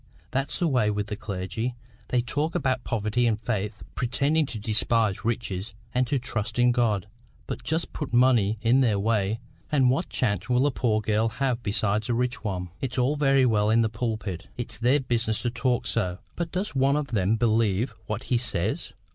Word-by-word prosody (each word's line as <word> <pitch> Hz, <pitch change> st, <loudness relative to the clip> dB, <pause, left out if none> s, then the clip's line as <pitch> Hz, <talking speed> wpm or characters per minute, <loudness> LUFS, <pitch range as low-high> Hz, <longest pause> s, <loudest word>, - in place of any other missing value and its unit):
That's 135 Hz, +1 st, -1 dB
the 175 Hz, -, +1 dB
way 125 Hz, -8 st, +2 dB
with 105 Hz, 0 st, -1 dB
the 105 Hz, -, -2 dB
clergy! 105 Hz, +3 st, -4 dB, 0.3 s
They 125 Hz, -, +2 dB
talk 150 Hz, +6 st, -1 dB
about 130 Hz, -2 st, 0 dB
poverty 115 Hz, +2 st, 0 dB
and 110 Hz, -2 st, +1 dB
faith, 105 Hz, -2 st, -3 dB
pretending 140 Hz, +5 st, +1 dB
to 120 Hz, -, -6 dB
despise 110 Hz, -1 st, +1 dB
riches 105 Hz, -3 st, -3 dB, 0.2 s
and 125 Hz, 0 st, +2 dB
to 140 Hz, -, +1 dB
trust 120 Hz, -4 st, -3 dB
in 120 Hz, 0 st, +5 dB
God; 115 Hz, -6 st, +1 dB, 0.4 s
but -, -, -5 dB
just 160 Hz, +2 st, -1 dB
put 150 Hz, -, -4 dB
money 120 Hz, -4 st, +4 dB
in 120 Hz, +4 st, +4 dB
their 110 Hz, -6 st, +3 dB
way, 105 Hz, 0 st, +1 dB, 0.3 s
and 135 Hz, -4 st, +4 dB
what 155 Hz, +8 st, -1 dB
chance 100 Hz, -6 st, -1 dB
will 125 Hz, +2 st, +3 dB
a 145 Hz, -, +3 dB
poor 110 Hz, -4 st, +1 dB
girl 110 Hz, +1 st, +1 dB
have 125 Hz, +1 st, -1 dB
beside 105 Hz, 0 st, 0 dB
a 120 Hz, -, +2 dB
rich 125 Hz, 0 st, -1 dB
one! 90 Hz, -4 st, -3 dB
It's 130 Hz, 0 st, -2 dB
all 130 Hz, +4 st, +2 dB
very 135 Hz, -2 st, +4 dB
well 105 Hz, -3 st, +3 dB
in 115 Hz, +1 st, +4 dB
the 110 Hz, -, +1 dB
pulpit. 110 Hz, -5 st, -3 dB
It's 120 Hz, -, -5 dB
their 125 Hz, +5 st, +4 dB
business 115 Hz, -3 st, -1 dB
to 120 Hz, -, 0 dB
talk 125 Hz, 0 st, 0 dB
so. 90 Hz, -7 st, -1 dB, 0.2 s
But 170 Hz, -1 st, -3 dB
does 190 Hz, -1 st, -2 dB
one 135 Hz, +1 st, +3 dB
of 150 Hz, -2 st, -1 dB
them 105 Hz, -2 st, +2 dB
believe 115 Hz, 0 st, +1 dB
what 110 Hz, +2 st, -3 dB
he 125 Hz, -, +1 dB
says? 105 Hz, -8 st, -1 dB
115 Hz, 195 wpm, -26 LUFS, 105-130 Hz, 0.4 s, in